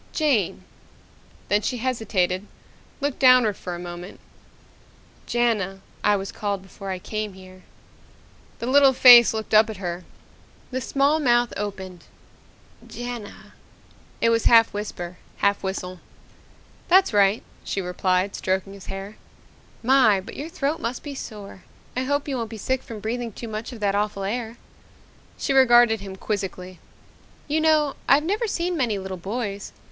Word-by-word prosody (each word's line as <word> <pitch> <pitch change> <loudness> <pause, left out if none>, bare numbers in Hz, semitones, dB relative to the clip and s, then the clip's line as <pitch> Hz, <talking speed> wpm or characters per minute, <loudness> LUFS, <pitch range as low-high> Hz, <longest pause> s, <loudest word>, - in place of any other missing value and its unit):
"Jane." 230 - +1 0.8
Then 205 +2 +2
she 250 - -2
hesitated, 210 -6 -1 0.5
looked 285 -1 -2
downward 255 -5 +5
for 180 -1 -6
a - - -8
moment. 175 +1 -8 1.1
"Jana, 210 -6 0 0.2
I 210 - +4
was 195 0 -4
called 200 -2 -3
before 195 +1 -9
I 190 - -2
came 215 +2 -4
here." 185 0 -14 1.0
The - - -5
little 270 +1 +5
face 245 -2 +9
looked 220 0 -5
up 215 +1 +6
at 215 - -6
her. 175 -1 -5 0.7
The 260 +1 -2
small 280 +5 +2
mouth 240 -4 +2
opened. 190 -3 -6 0.8
"Jana." 240 -3 -8 0.7
It 230 - +4
was 230 -1 +1
half 230 -1 +6
whisper, 180 -4 -6 0.2
half 200 0 +1
whistle. 185 -1 -4 0.9
"That's 370 - +4
right," 200 +1 +3 0.2
she - - -3
replied, 185 +1 0
stroking 190 +1 -2
his 200 -1 -12
hair. 195 +2 -7 0.7
"My, 245 -5 +5
but 190 - -10
your 300 +3 -6
throat 315 -2 -2
must 245 -3 -4
be 290 - -6
sore. 205 -7 -9 0.3
I 255 +1 -1
hope 285 +2 -1
you 270 -2 -2
won't 230 -2 -4
be 225 - -8
sick 260 +5 -1
from 220 -4 -9
breathing 230 +1 -3
too 235 - -7
much 220 +2 -5
of 240 - -9
that 200 -1 +1
awful 205 -1 -1
air." 225 +3 -4 0.8
She 275 - -1
regarded 240 -4 +5
him 195 -1 -8
quizzically. 185 -3 -5 0.7
"You 305 +2 0
know, 305 -3 +3
I've 285 +2 +5
never 415 +7 -1
seen 355 -2 -1
many 240 -9 0
little 190 -1 -5
boys. 200 +1 -5
215 Hz, 150 wpm, -24 LUFS, 195-255 Hz, 1.1 s, face